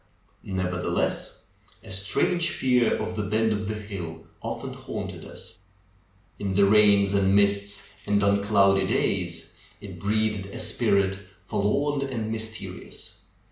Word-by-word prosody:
Never 90 -1 -2
theless, - - -1 0.4
a 110 - -10
strange 165 - +1
fear 125 -2 +2
of 110 0 -4
the 105 - -1
bend 110 +2 +1
of 105 0 -3
the 110 - -2
hill 95 -6 -7 0.2
often - - -5
haunted - - -6
us. - - -11 0.8
In 100 -2 -2
the 100 0 +6
rains 100 -1 +5
and 100 -1 +3
mists 100 0 +1
and 100 0 +2
on 100 0 +3
cloudy 100 -2 +4
days 90 -7 -1 0.3
it - - -9
breathed 105 -1 0
a 100 - -8
spirit 100 -1 +1 0.3
forlorn 140 +8 +1
and 120 -5 -3
mysterious. 110 0 -7
100 Hz, 135 wpm, -26 LUFS, 100-110 Hz, 0.8 s, the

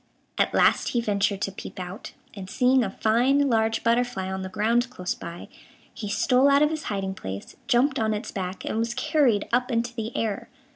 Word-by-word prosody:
At - - +3
last - - +3
he 240 - +2
ventured 200 -3 0
to 195 - -1
peep 190 - -9
out, 180 +2 -7 0.2
and, 190 -2 -8
seeing 255 +4 +3
a 205 - -2
fine 245 +8 +2
large 225 -2 +1
butterfly 235 -5 0
on 190 0 -3
the 190 - -5
ground 230 +5 +1
close 180 -7 -3
by, 170 +1 -9 0.5
he 210 - -6
stole 255 +5 +3
out 280 +1 +5
of 300 - +2
his 315 -1 -4
hiding 195 -2 -2
place, 95 - -7
jumped 270 +2 +3
on 220 -1 +1
its 210 +3 -3
back, 185 -1 -5
and 220 - -2
was 230 +1 -1
carried 255 -5 +2
up 250 +1 +2
into 235 +1 -1
the 225 -1 -4
air. 215 -3 -2
225 Hz, 200 wpm, -25 LUFS, 195-250 Hz, 0.5 s, out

